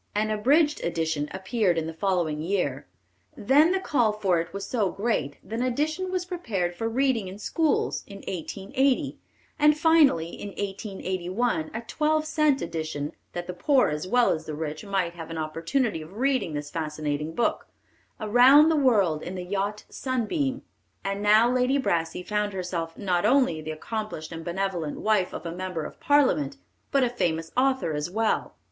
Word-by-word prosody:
An 215 +1 +1
abridged 290 +8 +3
edition 160 -3 -1
appeared 190 -1 0
in 160 - 0
the 160 - -5
following 165 -4 0
year; 160 - -1 0.5
then 290 - +4
the 380 - +1
call 245 - +2
for 195 -5 +1
it 165 - -8
was 200 0 -5
so 215 -6 0
great 195 -9 -1
that 225 +1 -5
an - - 0
edition 305 +9 -1
was 365 -1 -1
prepared 220 - -2
for 225 +5 -2
reading 245 -4 +1
in 185 +2 -8
schools, 310 +8 0
in 200 - -9
1880, 200 - -1 0.4
and 300 0 +5
finally, 305 - +4
in 205 - -7
1881, 190 -2 -2
a 225 - -4
twelve 310 +5 0
cent 305 -3 +2
edition, 155 -2 -4 0.2
that 175 0 -4
the 180 - -5
poor 260 +9 +3
as 150 +4 -3
well 245 +4 +4
as 155 - -3
the 155 - -4
rich 155 +1 -4
might 195 -4 -1
have 165 -2 -8
an 165 - -5
opportunity 165 - -1
of 165 +6 -11
reading 260 - +1
this 145 0 -5
fascinating 150 -1 -3
book, 235 - 0 0.5
Around 250 +8 +6
the 320 - +2
World 200 - +3
in 185 - -6
the 180 -1 -5
Yacht 200 +2 -2
Sunbeam. 260 +2 -2 0.4
And 195 +1 -2
now 215 +3 +5
Lady 250 +2 +2
Brassey 170 -8 -1
found 210 +1 -1
herself 175 -3 -4
not 180 -4 0
only 255 - +3
the 155 - -7
accomplished 160 0 -5
and 165 0 -6
benevolent 175 -3 -2
wife 210 -4 +2
of - - -7
a 165 - -3
member 180 -3 -4
of - - -9
Parliament, 285 0 +2 0.3
but 275 -2 +3
a 245 - +2
famous 165 -8 -1
author 260 -9 +2
as 150 +2 -2
well. 220 +4 0
200 Hz, 175 wpm, -26 LUFS, 165-255 Hz, 0.5 s, Around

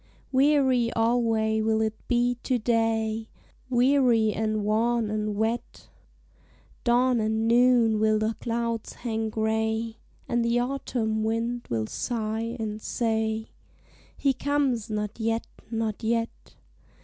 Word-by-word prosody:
Weary 265 -3 +3
alway 225 -1 +1
will 220 0 +1
it 220 -1 0
be 245 0 +2
to 255 - 0
day, 225 -1 0 0.4
Weary 245 -4 +3
and 215 -1 -1
wan 225 +1 +1
and 215 -1 -2
wet; 220 +3 -3 0.9
Dawn 245 0 +3
and 220 +1 0
noon 235 -2 +4
will 215 0 +3
the 215 +1 0
clouds 230 -1 -2
hang 225 -2 -3
gray, 220 +1 -1 0.3
And 240 -1 +1
the 235 +1 +2
autumn 245 -4 -1
wind 230 +2 -2
will 110 -2 -1
sigh 225 - -3
and 215 -1 -4
say, 220 -1 -1 0.7
"_He 275 -2 +2
comes 275 -6 0
not 210 0 -3
yet, 225 +1 0 0.2
not 225 -2 -2
yet. 230 0 -2
225 Hz, 120 wpm, -26 LUFS, 220-240 Hz, 0.9 s, noon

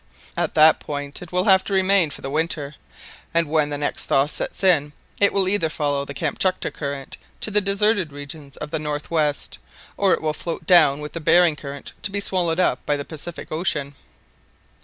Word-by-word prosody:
At - - -2
that 155 +1 +6
point 145 -1 -6
it 175 - -10
will 180 0 +1
have 190 -2 +5
to 200 - -3
remain 190 -3 +4
for - - -8
the 135 - -3
winter, 150 -2 -2 0.6
and 170 -1 +3
when 150 -1 +1
the 145 - -2
next 145 - -2
thaw 135 - +3
sets 150 - -4
in, 150 -6 +3 0.3
it 200 - +5
will 195 -2 +2
either 190 -4 +1
follow 145 -2 -1
the 140 - -8
Kamtchatka 180 +5 -1
Current 140 -2 -6 0.2
to 215 - -1
the 210 0 +3
deserted 200 -3 +1
regions 145 0 -10
of 150 - -6
the 160 - -1
north 150 0 -4
west, 150 -3 -1 0.4
or 195 -2 +3
it - - 0
will 155 -1 0
float 165 +1 -5
down 155 -5 +5
with 150 - -7
the 165 - -5
Behring 165 0 +5
Current 140 -1 -8
to - - -2
be 200 +1 -2
swallowed 180 -4 0
up 125 -8 +1
by 145 - 0
the 140 - -5
Pacific 160 +2 -7
Ocean." 150 -4 -1
155 Hz, 200 wpm, -22 LUFS, 145-185 Hz, 0.6 s, that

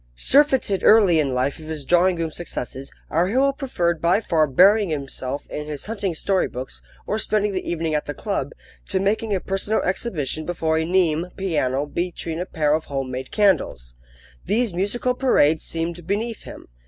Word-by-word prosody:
Surfeited 265 - +3
early 200 -7 +6
in 140 -3 +1
life 130 +4 -1
with 155 - -10
his 155 -3 -6
drawing 175 +3 +4
room 165 -1 -3
successes, 135 -5 -6 0.2
our 170 +3 +2
hero 265 +7 +2
preferred 175 - -1
by 175 +4 +3
far 160 -8 +1
burying 195 +8 +5
himself 140 -2 -4
in 150 0 -6
his 150 -2 -5
hunting 200 -5 -3
story 190 +3 +1
books, 130 +1 -6 0.2
or 215 - -1
spending 210 -1 0
the 185 -1 -4
evening 165 -2 -1
at 150 - 0
the 145 - -4
club, - - -3 0.4
to - - 0
making 210 +3 0
a - - 0
personal 195 +4 -1
exhibition 155 - -2
before 160 -2 0
a 160 - -1
Nimes 175 -1 +1
piano 145 -7 0
between 170 +1 -3
a 180 - -3
pair 150 -2 +1
of 155 +1 0
home 135 -2 -4
made 130 +1 -5
candles. 150 - +1 0.5
These 225 -2 0
musical 205 +8 0
parades 160 - +3
seemed 165 +1 -4
beneath 220 +2 -2
him. - - -10
170 Hz, 180 wpm, -22 LUFS, 150-200 Hz, 0.5 s, early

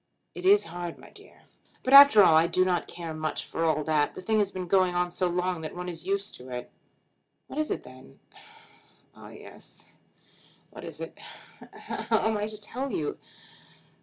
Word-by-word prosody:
"It 360 - -8
is 405 +2 +5
hard, 175 -1 -6
my - - -16
dear." - - -17 0.4
"But 260 - 0
after 280 -7 +10
all 165 - +6
I 160 +1 +5
do 185 +2 +2
not 180 -2 0
care 170 -2 -7
much 155 0 -4
for 165 - -4
all 155 -1 +1
that. 150 -1 0
The - - -7
thing 215 +3 +1
has 205 -2 +1
been 185 -2 -6
going 185 0 +2
on 175 0 0
so 180 +1 -1
long 180 -1 -2
that 155 - -7
one 180 0 -6
is 175 0 -7
used 200 +1 -2
to 125 +1 -13
it." 125 -1 -7 0.7
"What - - -7
is 310 - -1
it - - -3
then?" - - -15 1.0
"Ah; - - -13
yes; - - -13 0.9
what - - -11
is - - -8
it? - - -8
How 225 - -5
am 220 - 0
I 210 0 -2
to 215 -1 -8
tell 250 +6 -5
you?" 150 - -3
180 Hz, 195 wpm, -27 LUFS, 165-210 Hz, 1.0 s, after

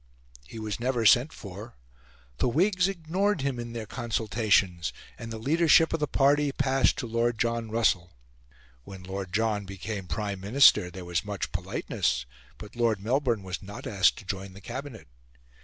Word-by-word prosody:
He 115 - -10
was 110 -1 -4
never 120 -1 0
sent 120 +9 +5
for. 105 +1 -10 0.6
The - - +2
Whigs 185 - +2
ignored 190 +1 -1
him 135 -3 -2
in 120 0 -6
their 115 -2 -5
consultations, 105 -7 0 0.2
and 115 0 -8
the 110 - -5
leadership 160 +6 +4
of 165 - 0
the 150 - 0
party 145 +1 +3
passed 135 -1 +2
to - - -3
Lord 115 0 0
John 115 0 -1
Russell. 95 -6 +1 0.7
When 95 +5 -10
Lord 95 0 -5
John 105 0 0
became 95 0 -6
Prime 100 +4 -3
Minister, 100 -2 +5
there 90 0 -9
was 85 0 -1
much 100 -2 -4
politeness, - - -2 0.3
but 105 +1 -11
Lord 115 -4 +1
Melbourne 120 0 0
was 95 0 -5
not 100 +1 -9
asked 95 -3 +3
to 105 - -11
join 95 0 -5
the 100 - -12
Cabinet. 125 +2 -7
115 Hz, 165 wpm, -27 LUFS, 100-130 Hz, 0.7 s, sent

